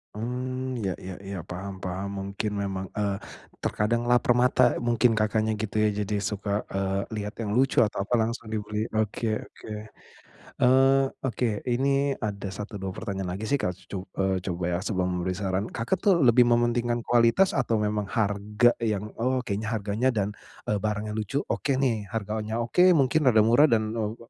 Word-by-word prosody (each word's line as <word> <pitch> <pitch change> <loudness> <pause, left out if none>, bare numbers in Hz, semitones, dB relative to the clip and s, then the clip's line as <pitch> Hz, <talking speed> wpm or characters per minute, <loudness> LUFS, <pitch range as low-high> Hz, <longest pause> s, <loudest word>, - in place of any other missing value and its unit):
Mmm, 125 +2 -3
iya 95 -5 -1
iya 95 0 -6
iya, 95 -1 -5
paham 95 +2 -5
paham, 95 +2 -3
mungkin 100 +2 -3
memang, 95 -1 -3
eee, 100 -2 0 0.5
terkadang 115 +3 0
laper 120 0 +4
mata, 125 - +3 0.2
eee, - - -5
mungkin 120 0 +4
Kakaknya 110 +1 +1
gitu 110 -1 -5
ya, 105 - +4
jadi 105 0 -1
suka, 105 -1 -4 0.2
eee, 95 0 -1 0.2
liat 105 0 -4
yang 105 -2 -3
lucu 135 -1 +4
atau 105 - +1
apa 125 - -4
langsung 115 +1 -2
dibeli, 105 +1 -2
oke 110 +1 -1 0.2
oke. - - -13 1.0
Eee, 135 +2 +5 0.2
oke, 125 - -2 0.2
ini 135 +3 +1
ada 100 -2 -4
1 105 +1 -7
2 95 - -3
pertanyaan 95 -4 -4
lagi 105 - -6
sih 140 +5 +1
Kak, 90 -1 -1 0.2
co 95 0 -5
eee, 95 -1 +1
coba 90 -1 -4
ya 85 - 0
sebelum 90 -3 -1
memberi 90 +1 -2
saran, 95 +1 -1
Kakak 120 +12 -2
tuh 195 -4 +4
lebih 120 0 +6
mementingkan 120 0 +1
kualitas 120 +11 +4
atau 120 -4 +1
memang 105 -1 -1
harga 105 +3 +2
yang, 105 -3 -1 0.2
"Oh 130 +1 +1
kayanya 110 +1 -3
harganya 105 +5 0
dan, 105 0 0 0.3
eee, 105 -2 -1
barangnya 105 0 -2
lucu, 110 +6 -2
oke 135 -1 -1
nih." 115 -7 0
Harganya 110 0 -3
oke 120 +10 0 0.2
mungkin 140 +3 +3
rada 110 -3 +5
murah 120 +7 +5
dan, 110 -2 +1
eee, 110 0 -2
110 Hz, 175 wpm, -26 LUFS, 100-120 Hz, 1.0 s, lebih